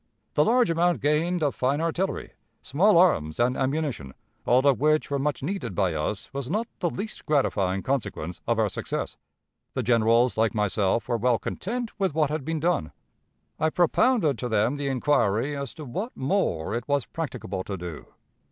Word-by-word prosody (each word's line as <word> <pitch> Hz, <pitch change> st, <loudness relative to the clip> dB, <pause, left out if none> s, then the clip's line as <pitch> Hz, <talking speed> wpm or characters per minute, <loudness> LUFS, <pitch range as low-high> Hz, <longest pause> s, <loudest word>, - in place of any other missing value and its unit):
The 150 Hz, -, +4 dB
large 240 Hz, 0 st, +3 dB
amount 170 Hz, -3 st, +2 dB
gained 160 Hz, +5 st, +1 dB
of 145 Hz, -, +1 dB
fine 135 Hz, +3 st, 0 dB
artillery, 165 Hz, +4 st, -2 dB, 0.3 s
small 175 Hz, +8 st, +3 dB
arms, 80 Hz, -, +3 dB
and 125 Hz, +2 st, +2 dB
ammunition, 135 Hz, -, -2 dB, 0.3 s
all 130 Hz, +3 st, +4 dB
of 140 Hz, -3 st, +4 dB
which 155 Hz, +1 st, +2 dB
were 140 Hz, -, 0 dB
much 140 Hz, -1 st, -1 dB
needed 145 Hz, -, -3 dB
by 95 Hz, -3 st, +1 dB
us, 80 Hz, -, -3 dB
was 135 Hz, -2 st, -4 dB
not 215 Hz, +6 st, 0 dB
the 175 Hz, -, +1 dB
least 205 Hz, +6 st, -6 dB
gratifying 95 Hz, -10 st, +1 dB
consequence 100 Hz, -, -3 dB
of 115 Hz, -1 st, +2 dB
our 110 Hz, -1 st, +3 dB
success. -, -, -4 dB, 0.6 s
The 130 Hz, -, -2 dB
generals, 115 Hz, +1 st, +3 dB
like 110 Hz, -1 st, +2 dB
myself, 105 Hz, +1 st, +1 dB
were 120 Hz, -2 st, 0 dB
well 120 Hz, +1 st, +2 dB
content 235 Hz, -, -4 dB
with 190 Hz, -6 st, 0 dB
what 150 Hz, -3 st, +2 dB
had 155 Hz, -2 st, -2 dB
been 160 Hz, +2 st, -2 dB
done. 150 Hz, -, 0 dB, 0.7 s
I 160 Hz, -, +2 dB
propounded 175 Hz, -, +2 dB
to 125 Hz, -, -3 dB
them 110 Hz, +5 st, +1 dB
the 140 Hz, -1 st, -2 dB
inquiry 130 Hz, -1 st, +1 dB
as 140 Hz, -2 st, -4 dB
to 155 Hz, -3 st, -8 dB
what 195 Hz, -, -5 dB
more 130 Hz, -, 0 dB
it 120 Hz, 0 st, -3 dB
was 140 Hz, -3 st, +1 dB
practicable 110 Hz, -, -5 dB
to 100 Hz, -, -4 dB
do. 85 Hz, -4 st, -7 dB
135 Hz, 180 wpm, -26 LUFS, 110-160 Hz, 0.7 s, The